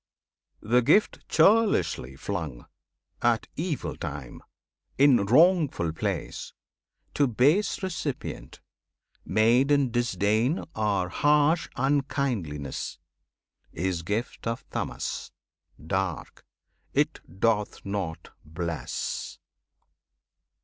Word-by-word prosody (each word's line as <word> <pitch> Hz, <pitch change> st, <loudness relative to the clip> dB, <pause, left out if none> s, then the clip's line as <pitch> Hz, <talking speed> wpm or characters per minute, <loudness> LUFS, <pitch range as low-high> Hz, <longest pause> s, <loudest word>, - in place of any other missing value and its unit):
The 120 Hz, +3 st, +3 dB
gift 205 Hz, -, +2 dB
churlishly 195 Hz, -, +3 dB
flung, 75 Hz, -6 st, -5 dB, 0.6 s
at 120 Hz, -2 st, +2 dB
evil 165 Hz, -2 st, -3 dB
time, 70 Hz, -4 st, -7 dB, 0.6 s
In 130 Hz, -7 st, +5 dB
wrongful 150 Hz, -, +4 dB
place, -, -, -4 dB, 0.6 s
to 145 Hz, -, +3 dB
base 145 Hz, -, +2 dB
recipient, 165 Hz, -7 st, -5 dB, 0.6 s
Made 115 Hz, +7 st, +3 dB
in 140 Hz, -4 st, +3 dB
disdain 115 Hz, -, +1 dB
or 100 Hz, -4 st, 0 dB
harsh 150 Hz, -, +3 dB
unkindliness, 125 Hz, -, -1 dB, 0.8 s
Is 90 Hz, -1 st, -1 dB
gift 105 Hz, +7 st, -3 dB
of 115 Hz, 0 st, -3 dB
Tamas, -, -, -4 dB, 0.5 s
dark; 95 Hz, -1 st, -3 dB, 0.5 s
it -, -, +1 dB, 0.2 s
doth 105 Hz, -1 st, 0 dB
not 95 Hz, -5 st, -4 dB
bless! 80 Hz, -3 st, -4 dB
115 Hz, 80 wpm, -27 LUFS, 90-145 Hz, 0.8 s, In